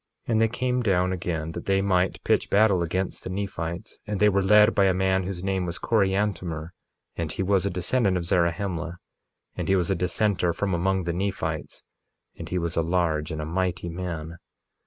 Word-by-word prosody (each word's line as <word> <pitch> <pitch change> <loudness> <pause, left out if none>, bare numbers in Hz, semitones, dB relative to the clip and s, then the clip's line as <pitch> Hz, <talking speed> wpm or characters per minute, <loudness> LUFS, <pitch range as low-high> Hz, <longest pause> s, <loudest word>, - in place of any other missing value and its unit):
1:15 - - -3
And 110 -1 +3
they 115 - +5
came 125 +2 -1
down 95 -4 +2
again 80 -3 -3
that - - -7
they 95 0 +3
might 95 -2 +1
pitch - - +1
battle 100 -3 +4
against 90 +3 -2
the - - -5
Nephites. 95 -1 -4
And 105 -2 -2
they 105 - +5
were 100 -1 +2
led 105 +3 +6
by 100 - +4
a 95 -1 +3
man 95 0 +1
whose 95 -2 -5
name 95 -2 -1
was 85 0 -3
Coriantumr; 95 -7 0 0.4
and 80 -2 -3
he 95 - -2
was 95 0 +2
a - - 0
descendant 95 +2 +1
of 85 - -3
Zarahemla; 85 0 0 0.6
and - - -3
he 95 - +5
was 90 0 +1
a - - +2
dissenter 90 0 +1
from 95 +2 -1
among 95 +2 +1
the 85 0 -2
Nephites; 85 -4 -3 0.5
and - - -8
he 90 - -1
was 85 -2 -2
a - - +3
large 80 -2 0
and 80 -2 -4
a - - -4
mighty 90 +1 -2
man. 85 -2 -5
90 Hz, 200 wpm, -25 LUFS, 85-100 Hz, 0.6 s, led